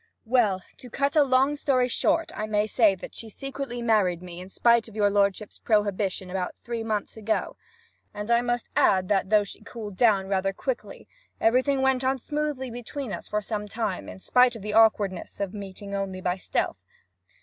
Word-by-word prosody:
'Well, 220 -6 +2
to 250 - -11
cut 280 +5 -1
a 305 - +7
long 265 +2 +3
story 260 -3 +2
short, 325 +6 +1
I 215 - -3
may 210 -1 +1
say 215 -2 +3
that 185 - -10
she 225 - -9
secretly 270 0 -5
married 190 -7 +2
me, 175 -1 -8
in 185 - -10
spite 235 +3 +3
of 220 - -13
your 205 -2 +3
lordship's 200 +1 0
prohibition, 200 -3 0
about 185 -1 -3
three 235 -1 -5
months 215 -1 -3
ago. 220 0 -1 0.6
And 210 +2 -5
I 235 0 +5
must 240 0 -1
add 185 -2 +3
that, 195 -2 +1
though 210 -1 +5
she 200 - -10
cooled 215 -2 -8
down 200 -4 +3
rather 195 0 0
quickly, - - -5 0.3
everything 260 +4 +3
went 265 -1 +2
on 265 +1 +1
smoothly 295 -1 -3
enough - - -9
between 245 0 -5
us - - -6
for 210 0 -2
some 210 0 -4
time; 210 -3 -3
in - - -9
spite 250 +5 +3
of 220 - -9
the 210 0 -3
awkwardness 210 -4 +2
of 200 -1 -2
meeting 200 -1 -8
only 195 -1 -3
by 180 -1 0
stealth. - - -2
215 Hz, 195 wpm, -26 LUFS, 195-245 Hz, 0.6 s, a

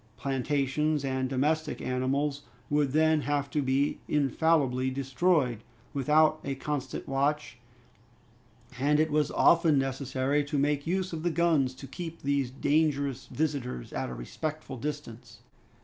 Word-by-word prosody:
Plantations 140 +2 0
and 130 -1 -1
domestic 150 +4 0
animals 135 +3 -1 0.3
would 145 -2 +2
then 155 +1 +3
have 145 -1 -1
been 140 -1 +1
infallibly 140 -2 +2
destroyed, 135 - +1 0.3
without 155 +3 +3
a 140 -1 -3
constant 135 -1 -4
watch, 135 -3 -1 1.2
and 145 +3 +3
it 155 0 +2
was 150 -1 +2
often 165 -3 +4
necessary 135 +1 0
to 145 +1 -3
make 145 +1 0
use 185 +1 -1
of 160 - -3
the 175 - +1
guns 160 -6 +2
to 135 - -10
keep 165 +5 -7
those 140 -2 +1
dangerous 140 -1 0
visitors 140 - -3
at - - -2
a 65 - -6
respectful 145 - -5
distance. 145 -3 -7
140 Hz, 130 wpm, -29 LUFS, 130-155 Hz, 1.2 s, often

